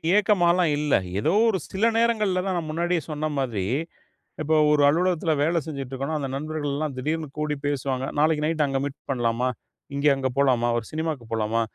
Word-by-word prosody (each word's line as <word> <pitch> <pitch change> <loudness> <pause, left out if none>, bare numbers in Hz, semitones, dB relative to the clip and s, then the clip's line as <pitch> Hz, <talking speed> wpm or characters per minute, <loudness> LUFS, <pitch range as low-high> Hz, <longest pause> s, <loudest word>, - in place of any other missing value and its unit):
ஏக்கமால்லாம் 180 -5 +3
இல்ல. 150 -1 0 0.3
ஏதோ 155 +10 +1 0.2
ஒரு 195 -4 0
சில 195 +4 +1
நேரங்கள்ல 215 -5 +2
தான் 190 -1 -1
நான் 160 -2 -4
முன்னாடியே 170 +2 0
சொன்ன 155 +1 -2
மாதிரி, 115 -8 -1 0.8
இப்ப 155 +1 0 0.2
ஒரு 150 -1 +4
அலுவலகத்துல 170 0 +1
வேல 170 +2 +2
செஞ்சுகிட்டு 135 -4 -6
இருக்கோன்னா, 140 +4 -2
அந்த 135 -2 -3
நண்பர்கள்லாம் 150 -1 -3
திடீர்னு 155 +4 -2
கூடி 150 -1 -1
பேசுவாங்க. 135 -2 -1
"நாளைக்கு 150 0 +2
நைட்டு 155 -1 +1
அங்க 135 -1 -1
மீட் 145 0 -5
பண்ணலாமா? 120 0 0 0.5
இங்க, 140 +1 +1
அங்க 135 -1 -1
போலாமா? 125 -4 +3
ஒரு 115 - -3
சினிமாவுக்கு 155 -5 -3
போலாமா? 110 +1 0
150 Hz, 170 wpm, -25 LUFS, 135-165 Hz, 0.8 s, ஒரு